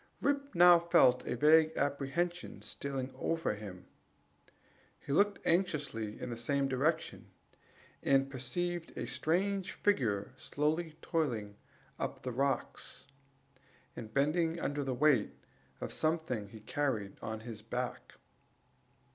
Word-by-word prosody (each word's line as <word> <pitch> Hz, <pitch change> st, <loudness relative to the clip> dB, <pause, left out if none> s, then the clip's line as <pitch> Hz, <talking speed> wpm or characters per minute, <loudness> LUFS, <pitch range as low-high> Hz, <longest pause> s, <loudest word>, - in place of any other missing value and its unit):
Rip 280 Hz, -3 st, -1 dB
now 175 Hz, 0 st, +8 dB
felt 130 Hz, -7 st, +4 dB
a -, -, -1 dB
vague 155 Hz, +4 st, +5 dB
apprehension 145 Hz, +5 st, -2 dB
stealing 135 Hz, -2 st, -4 dB
over 165 Hz, -8 st, -1 dB
him; 100 Hz, -4 st, -9 dB, 1.1 s
he 145 Hz, -, -7 dB
looked 205 Hz, +5 st, +3 dB
anxiously 145 Hz, -, 0 dB
in 125 Hz, -, -5 dB
the 115 Hz, -, -4 dB
same 140 Hz, +4 st, +1 dB
direction, 150 Hz, +5 st, -1 dB, 0.7 s
and 135 Hz, 0 st, +3 dB
perceived 165 Hz, +7 st, -3 dB
a -, -, -2 dB
strange 185 Hz, +9 st, 0 dB
figure 115 Hz, -, 0 dB
slowly 155 Hz, +4 st, -1 dB
toiling 120 Hz, -, -1 dB, 0.4 s
up -, -, -4 dB
the 125 Hz, -, -3 dB
rocks, 135 Hz, +3 st, -2 dB, 0.9 s
and 110 Hz, -2 st, -8 dB
bending 160 Hz, +5 st, +1 dB
under 145 Hz, -2 st, -1 dB
the 130 Hz, -2 st, -2 dB
weight 135 Hz, -5 st, +3 dB, 0.4 s
of -, -, -4 dB
something 155 Hz, -10 st, -1 dB
he 110 Hz, +1 st, -11 dB
carried 110 Hz, -5 st, -2 dB
on 110 Hz, 0 st, -4 dB
his 110 Hz, -2 st, -8 dB
back. 125 Hz, +3 st, -4 dB
140 Hz, 120 wpm, -33 LUFS, 120-165 Hz, 1.1 s, now